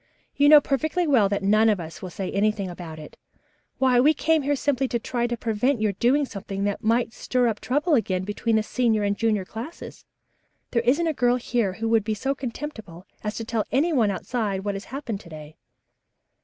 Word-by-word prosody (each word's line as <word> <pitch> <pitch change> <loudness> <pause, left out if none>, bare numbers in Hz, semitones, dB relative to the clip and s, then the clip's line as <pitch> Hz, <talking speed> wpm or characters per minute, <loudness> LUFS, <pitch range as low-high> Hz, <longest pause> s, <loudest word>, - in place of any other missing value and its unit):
"You 285 +1 +5
know 300 0 +10
perfectly 315 +5 -1
well 245 -10 +4
that 200 0 -2
none 215 +3 +4
of 210 -3 +1
us 165 -1 -8
will 185 - -6
say 185 +1 -5
anything 200 -2 0
about 170 -3 -8
it. 155 -1 -11 0.6
Why, 255 -2 +3
we 300 +5 +5
came 320 -1 +2
out - - -7
here 290 +1 +2
simply 275 -1 0
to 240 - -1
try 240 +1 -2
to 240 0 -3
prevent 235 +3 0
your 215 -1 +1
doing 255 +9 +2
something 195 -4 -5
that 205 0 -2
might 230 +1 +1
stir 250 -1 0
up 220 -2 -1
trouble 295 +6 0
again 190 -8 +1
between 215 +3 -1
the 220 - +2
senior 225 -2 +1
and 200 0 +1
junior 215 -3 0
classes. 230 - -9 0.7
There 235 - +2
isn't 270 +8 +2
a 320 - 0
girl 245 -3 +2
here 235 -5 -1
who 225 +3 -3
would 225 -2 +3
be 215 +1 -2
so 270 +6 -1
contemptible 230 - -7 0.2
as 210 0 -3
to 225 - -5
tell 225 -1 -1
any 320 +6 +2
one 230 -7 +3
outside 200 -1 -2
about - - -13
what 205 - -1
has 195 - -6
happened 240 -6 -5
to 180 - -14
day." 155 -1 -11
225 Hz, 220 wpm, -24 LUFS, 200-265 Hz, 0.7 s, know